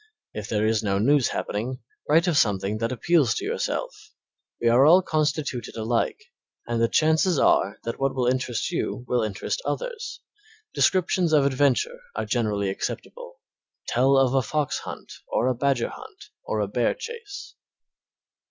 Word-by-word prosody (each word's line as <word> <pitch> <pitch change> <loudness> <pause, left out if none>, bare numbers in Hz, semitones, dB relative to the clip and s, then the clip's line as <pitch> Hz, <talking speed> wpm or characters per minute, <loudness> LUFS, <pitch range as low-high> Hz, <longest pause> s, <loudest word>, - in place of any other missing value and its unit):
If 105 -1 -6
there 105 -1 +1
is 110 -1 +2
no 100 -2 0
news 135 +5 +3
happening, 120 +5 -3 0.3
write 160 +3 +5
of 175 -4 +1
something 105 -4 +1
that 115 +1 -1
appeals 140 -3 +2
to - - -3
yourself. - - -2 0.7
We 120 - 0
are 120 +3 +5
all 175 +6 +6
constituted 150 -5 -1
alike, 115 - -1 0.5
and 120 -1 -1
the 115 - +4
chances 160 +5 +2
are - - +3
that 115 - -5
what 135 0 0
will 125 -2 0
interest 125 +1 -1
you 130 -7 -3
will 125 - +1
interest 110 - -3
others. 475 -2 -4 0.5
Descriptions 180 -2 +2
of 145 -2 +5
adventure 140 - +1 0.2
are - - -2
generally 105 -5 0
acceptable. - - -6 0.5
Tell 135 +3 +3
of 135 -1 +3
a 135 - +3
fox 150 +2 -1
hunt, - - -9
or - - 0
a 130 - +2
badger 130 -1 0
hunt, - - -12
or 110 - -2
a 105 - -1
bear 120 +4 0
chase. 460 -4 -8
130 Hz, 160 wpm, -25 LUFS, 115-155 Hz, 0.7 s, all